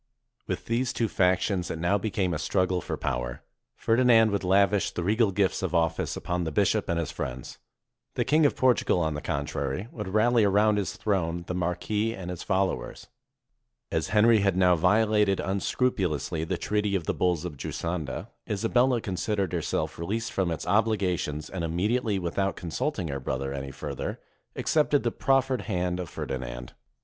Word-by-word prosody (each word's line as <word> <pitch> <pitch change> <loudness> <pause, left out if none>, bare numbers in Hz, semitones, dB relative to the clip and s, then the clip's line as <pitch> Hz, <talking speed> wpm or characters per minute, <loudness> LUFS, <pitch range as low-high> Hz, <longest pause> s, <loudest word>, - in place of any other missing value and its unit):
With - - -3
these 120 +2 0
two 115 - 0
factions 90 -1 +1
it - - -3
now 85 +5 +1
became 95 -3 -1
a 75 - -2
struggle 90 +2 0
for - - -4
power. - - -3 0.3
Ferdinand 115 -2 +4
would 100 -1 -1
lavish 100 +2 +3
the 85 - -4
regal 110 +4 +3
gifts 95 0 +1
of 95 -2 -2
office 80 -1 0
upon 90 0 -2
the 80 - -3
bishop - - +1
and 85 - +1
his 85 -3 -2
friends. 65 0 -6 0.6
The - - 0
Kjng 155 0 +4
of - - -3
Portugal, 125 -7 +3
on 80 -2 0
the 75 - -4
contrary, 70 - -3
would 105 -4 -6
rally 110 +4 +3
around 105 +1 +3
his 100 - -3
throne 85 -5 -1
the 90 - -4
mar 90 -1 0
quis 110 +4 -1
and 90 -2 -5
his 90 - -6
followers. 95 -1 -2 0.8
As 80 +2 0
Henry 110 +2 +5
had 95 -2 +1
now 90 -1 +5
violated 105 +3 +3
un 95 +1 -1
scrupulously 90 - -1
the - - -2
treaty 105 -1 0
of 90 -4 -1
the - - 0
Bulls 90 -2 0
of 85 -4 -5
Giusanda, 80 0 -4 0.2
Isa 105 +2 -1
bella 125 -1 +3
considered 100 -1 -2
herself - - -2
released 110 +7 -2
from 95 -3 0
its 80 - -3
obligations, 90 -7 0
and 90 -3 -5
immediately, 105 +6 0
without 95 +2 -1
consulting 90 - -3
her 70 -1 -3
brother 65 +1 -3
any 70 0 -5
further, - - -5 0.4
accepted 150 -2 +2
the 120 - +1
proffered 135 -1 +1
hand 90 -2 -1
of 90 -3 -5
Ferdinand. - - -5
95 Hz, 175 wpm, -27 LUFS, 85-110 Hz, 0.8 s, Henry